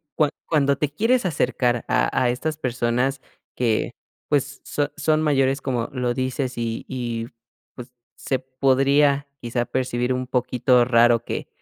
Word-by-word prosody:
cua 150 -2 +2 0.2
cuando 140 -3 +2
te 150 0 0
quieres 230 - +1
acercar 125 -7 0
a - - +2
a 125 - +3
estas 155 +5 -3
personas 125 0 -1 0.3
que, 115 -3 0 0.4
pues, 145 0 -1
so 145 0 -2
son 155 0 +2
mayores, 135 -2 +2
como 125 -4 -2
lo 125 -2 -1
dices, 130 0 -2
y 115 -1 -3
y 120 -3 -4 0.5
pues, 125 0 -10 0.2
se 130 - -2
podría 135 +2 +2
quizá 120 0 -2
percibir 125 -1 -1
un 130 0 -1
poquito 125 0 +2
raro 120 -1 +4
que - - -4
130 Hz, 145 wpm, -23 LUFS, 120-140 Hz, 0.5 s, raro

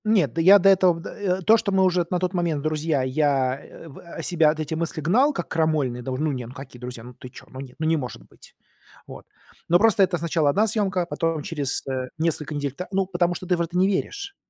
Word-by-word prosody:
Нет, 215 -3 +2
до 165 - 0
я 190 +4 +8
до 195 0 +4
этого, 185 -3 +4
э, 190 -2 -2
то, 220 +5 +6
что 205 - -2
мы 190 0 +3
уже 180 -2 +2
на 180 - 0
тот 180 +1 -2
момент 170 -5 -1
друзья, 155 -2 0
я, 135 -1 +1
э, - - -13
в 140 - -12
э, 170 - -9
себя, 165 -4 +3
от 155 +1 -2
эти 155 0 -3
мысли, 160 0 -3
гнал, 240 - +3
как 275 - -5
крамольные, 155 -6 0
да 130 - -5
уж, 130 - -3
ну 155 0 0
не, 125 -4 -5
ну 125 - -11
какие 130 -2 -11
друзья, 125 -2 -7
ну 125 +1 -11
ты 125 - -12
чё, 125 - -14
ну 130 - -10
нет, 130 -2 -9
ну, 155 - -3
не 160 0 +2
может 125 - -6
быть. - - -19 0.5
Вот. - - -11 0.4
Но 175 - +6
просто 215 -2 +4
это 180 -1 +1
сначала 160 -2 0
1 205 +9 +3
съёмка, 195 -4 0
потом 165 -3 -2
через, 145 -5 -2
э, 130 -1 -3
несколько 155 -2 -2
недель 145 -1 -2
та 180 +6 -7
ну, 195 0 +1
потому 175 -1 0
что 185 - -7
ты 180 - +2
в - - -1
это 170 +1 -3
не 185 +1 +4
веришь. 400 - -3
165 Hz, 255 wpm, -23 LUFS, 140-185 Hz, 0.5 s, я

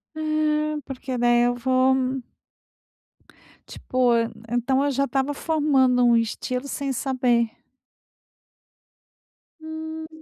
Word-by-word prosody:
É, 305 -1 0
porque 260 -1 -5
daí 240 0 +3
eu 245 0 +1
vou, 255 +1 +2
hum 260 -1 -2 1.5
Tipo, 255 -1 0
en 230 0 0 0.2
então 245 +3 +1
eu - - +1
já 275 +1 +1
estava 275 0 -1
um - - -3
formando 280 -5 +2
um 240 -1 +5
estilo 250 +3 -2
sem 275 -1 -3
saber. 250 -3 +1 2.1
Hum. 315 0 -7
265 Hz, 110 wpm, -24 LUFS, 245-300 Hz, 2.1 s, um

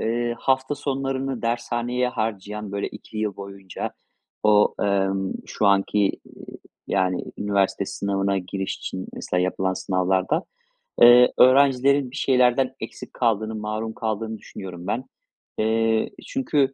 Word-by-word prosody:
eee, 120 +1 -1
hafta 130 +3 +1
sonlarını 135 -2 -3
dershaneye 120 +1 -1
harcayan, 105 -3 -4
böyle 100 - -2
2 110 - -10
yıl 105 -2 -2
boyunca 100 -1 -6 0.5
o, 105 -1 +4
emm, 95 -1 +1
şu 105 - -1
anki, 100 +1 +3 0.3
eee, - - -13 0.4
yani, 95 -2 0
üniversite 100 -2 0
sınavına 100 0 -1
giriş 95 +1 -4
için 95 0 -6
mesela 90 - -2
yapılan 95 +1 0
sınavlarda, 95 - 0 0.6
eee, 120 +1 +8
öğrencilerin 135 0 +5
bir - - -10
şeylerden 130 -1 +3
eksik - - -8
kaldığını, 110 -2 0
mahrum 110 +1 -3
kaldığını 110 0 -3
düşünüyorum 90 -3 -9
ben. 120 +5 -1 0.6
Eee, 110 0 +2 0.2
çünkü, 145 - +1
110 Hz, 120 wpm, -24 LUFS, 100-125 Hz, 0.6 s, eee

